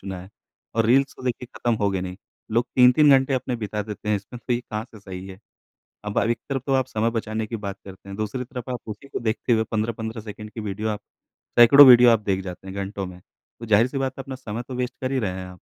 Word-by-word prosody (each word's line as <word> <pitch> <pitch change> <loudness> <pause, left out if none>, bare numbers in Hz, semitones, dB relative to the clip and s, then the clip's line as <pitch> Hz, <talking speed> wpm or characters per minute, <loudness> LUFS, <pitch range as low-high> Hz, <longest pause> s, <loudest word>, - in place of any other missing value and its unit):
चुना 95 -2 -6
है, 95 - -12 0.5
और 115 -1 +2
रील्स 135 +4 +3
तो - - -12
देखिए 125 0 -3
ख़त्म 120 -1 +1
होगे 95 -2 +1
नहीं। 90 0 -5 0.4
लोग 120 +2 +2
3-3 125 +4 +7
घंटे 135 0 +1
अपने 125 -1 -2
बिता 105 -1 -3
देते 105 0 -7
हैं 105 - +3
इसमें 100 +5 -9
तो 125 - +1
ये 120 - +1
कहाँ 110 -2 -5
से 110 -4 -15
सही 95 -1 -8
है? 95 -1 -10 0.7
अब 105 0 -1
अ, - - +3
एक 120 +1 0
तरफ़ 135 -2 -2
तो 135 - 0
आप 130 -2 +2
समय 110 +1 0
बचाने 110 -1 -3
की 115 - -4
बात 100 -2 -5
करते 95 0 -12
हैं, 100 - -7
दूसरी 110 +4 -3
तरफ़ 125 0 -7
आप 125 - -2
उसी 110 +6 -8
को - - -4
देखते 115 +1 -1
हुए 110 -1 +3
15-15 110 +1 -2
सेकंड 105 0 -9
की 110 - -7
वीडियो 105 +1 -3
आप 105 -1 -2 0.6
सैकड़ों 140 +5 +10
वीडियो 125 -1 +9
आप 115 - +5
देख 95 -2 0
जाते 90 0 -8
हैं 95 - -7
घंटों 100 0 -4
में, 90 0 -10 0.4
तो 115 - -7
ज़ाहिर 110 +2 +4
सी 135 - -5
बात 135 -1 -2
है - - -4
अपना 135 -1 -6
समय 120 -3 -6
तो 130 - -6
वेस्ट 125 0 -2
कर 130 0 -2
ही 135 - +1
रहे 105 -6 -1
हैं 95 - -6
आप। 90 -1 -13
110 Hz, 265 wpm, -24 LUFS, 100-125 Hz, 0.7 s, सैकड़ों